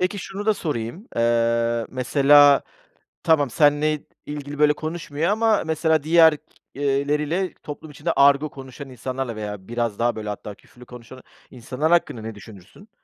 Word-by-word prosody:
Peki 185 +3 -1
şunu 195 +2 -7
da 215 - +3
sorayım, 150 - -5
eee, 115 0 +1
mesela 140 +2 +5 0.6
tamam 150 -5 +3
senle 150 +2 +2 0.2
ilgili 145 0 -7
böyle 150 0 +5
konuşmuyor 155 0 -4
ama, 220 0 +2
mesela 160 -1 0
diğerleriyle 150 0 +1
toplum 150 +1 -9
içinde 150 +4 -3
argo 140 +2 +4
konuşan 135 +1 -11
insanlarla 130 -1 -5
veya 105 -3 -7
biraz 115 -3 -3
daha 120 0 +1
böyle, 105 -1 -6
hatta, 105 0 -7
küfürlü 125 +4 -18
konuşan 125 +1 -12 0.3
insanlar 130 +6 -3
hakkında 170 -9 +1
ne 110 0 -7
düşünürsün? 105 - -15
145 Hz, 140 wpm, -22 LUFS, 120-155 Hz, 0.6 s, mesela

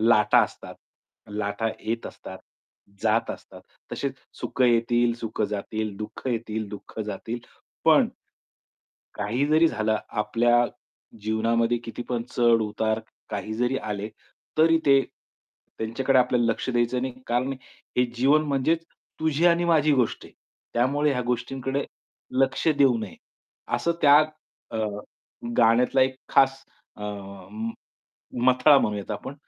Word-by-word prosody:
लाटा 110 -2 +5
असतात. - - -10 0.5
लाटा 105 +2 -2
येत 115 +1 -3
असतात, 95 - -10 0.6
जात - - +2
असतात. - - -10 0.3
तसेच 140 -1 -2 0.3
सुखं 130 - 0
येतील, 120 0 +3
सुखं 110 -2 -3
जातील, 105 0 -3
दुःख 105 +4 -7
येतील, 110 -2 -3
दुःख 105 +2 -10
जातील. 110 +3 -4 0.5
पण, - - +5 1.1
काही 115 +7 -1
जरी 155 +2 +5
झालं 110 -5 0
आपल्या 120 +3 +2 0.6
जीवनामध्ये 115 +2 +1
कितीपण 120 +1 -4
चढ-उतार 110 -2 +2 0.3
काही 105 0 -4
जरी 125 +3 0
आले, 105 0 -4 0.5
तरी 165 +1 +5
ते 135 -1 +6 0.8
त्यांच्याकडे 130 +4 +1
आपल्याला 125 -1 +2
लक्ष - - -6
द्यायचं 120 +1 +1
नाही. 130 -1 -3
कारण 125 +3 0 0.4
हे 125 - +4
जीवन 140 +5 +4
म्हणजेच 150 +4 +1 0.4
तुझी 160 +1 +2
आणि 175 0 +4
माझी 155 -3 +4
गोष्ट 125 -4 0
आहे. - - -18 0.4
त्यामुळे 140 +5 +2
ह्या 125 -2 -1
गोष्टींकडे 135 +3 -2 0.6
लक्ष 135 +4 0
देऊ 135 -4 +5
नये. 105 -6 -7 0.6
असं 170 - 0
त्या 145 0 +8 0.5
अ, 115 - -4 0.8
गाण्यातला 120 +4 +4
एक 130 0 0
खास 135 0 +3 0.3
अ, - - -14
म 100 +2 -6 0.8
मथळा 130 +3 +6
म्हणूयात 105 -4 -2
आपण 140 - -5
120 Hz, 120 wpm, -25 LUFS, 110-135 Hz, 1.1 s, त्या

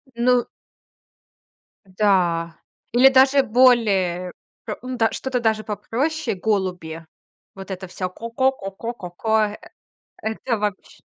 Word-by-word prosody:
Ну 245 +1 +2 1.4
да. 180 -4 +1 0.3
Или 255 +3 +7
даже 270 +1 +5
более 210 -8 +3 0.3
п - - -4
м, 255 0 -5
да, 225 -2 +2
что-то 260 -2 -2
даже 220 -2 +1
попроще, 275 +7 -2
голуби- 180 -5 -2 0.5
вот 195 0 -10
это 190 0 -6
всё 185 0 -4
"ко 230 +5 -8
ко 260 +2 +3
ко 195 -7 -8
ко 230 +5 -5
ко 180 -7 -8
ко". 220 +5 0 0.9
Э 220 - -1
это 230 +1 -2
вообщ 205 -2 -4
220 Hz, 130 wpm, -22 LUFS, 185-250 Hz, 1.4 s, Или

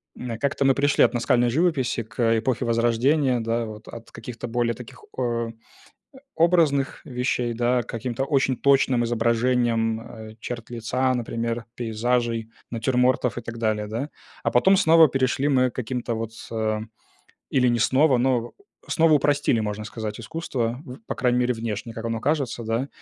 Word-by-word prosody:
м, 120 -3 -5
как-то 140 0 0
мы 135 -1 +4
пришли 145 +1 +3
от - - +3
наскальной 120 0 +2
живописи 135 -5 +1
к 115 +1 +1
эпохе 120 0 -1
Возрождения, 120 +4 +2
да, 115 +1 -1
вот 110 0 -10
от 115 -1 -10
каких-то 120 -1 -7
более 120 0 0
таких, 125 +1 -12
о, 115 -2 -1 0.8
образных 160 -5 +2
вещей, 125 -1 -1
да, 120 +1 +1
к 120 - -13
каким-то 125 +2 -3
очень 135 -3 +1
точным 135 -3 +3
изображениям, 115 -1 +1
э, 110 -1 -10
черт 120 -1 -6
лица, 120 +2 0
например, 115 -1 -3
пейзажей, 115 0 -1 0.2
натюрмортов 125 +1 +1
и - - -3
так 115 0 -7
далее, 110 -2 -1
да. 120 +7 -4 0.3
А - - +1
потом 190 +11 +5
снова 165 -3 +6
перешли 135 +1 0
мы 130 -3 +3
к - - -35
каким-то 125 -1 -3
вот, 115 0 -4 0.2
э, 110 -1 -1 0.7
или 125 -2 +3
не 120 -1 +1
снова, 130 +2 +4
но 120 -2 +1 0.4
снова 165 -1 +4
упростили, 145 -4 +2
можно 105 0 -3
сказать, 110 -1 -6
искусство, 125 -4 -3
в 125 -1 -9
по - - -3
крайней 125 -1 +1
мере, 125 0 +2
внешне, 115 0 -5
как 115 +1 -6
оно 115 -1 -2
кажется, 140 -5 -1
да, 115 +5 -1
120 Hz, 160 wpm, -24 LUFS, 115-130 Hz, 0.8 s, снова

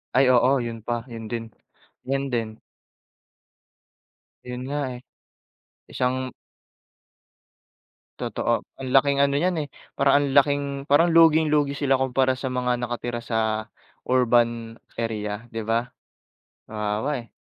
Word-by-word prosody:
Ay, 135 0 +5
oo. 130 +2 +4
Yun 115 -1 -5
pa, 120 -1 -1
yun 115 -1 -7
din. 115 -1 -5 0.5
Yun 135 +1 -1
din. 110 -2 -2 1.9
Yun 125 0 -6
nga, 145 +1 -1
eh, 125 - -8 0.9
isang 130 0 -1 1.8
Totoo. - - -1 0.2
Ang 130 - -4
laking 140 +1 +4
ano 140 0 +3
niyan 180 +3 +1
eh, 145 - -5 0.3
parang 140 0 +3
ang - - -1
laking 145 0 +4 0.3
parang 165 +4 +5
luging-lugi 155 -3 +4
sila 135 -2 +2
kumpara 130 0 +2
sa 130 +1 -4
mga 125 -1 0
nakatira 120 0 -3
sa 110 -1 -1 0.4
urban 120 -2 +2 0.2
area, 110 -1 -3
di 115 - -3
ba? 115 +2 0 0.8
Kawawa 110 +5 -2
eh. 115 - -25
125 Hz, 120 wpm, -24 LUFS, 115-140 Hz, 1.9 s, Ay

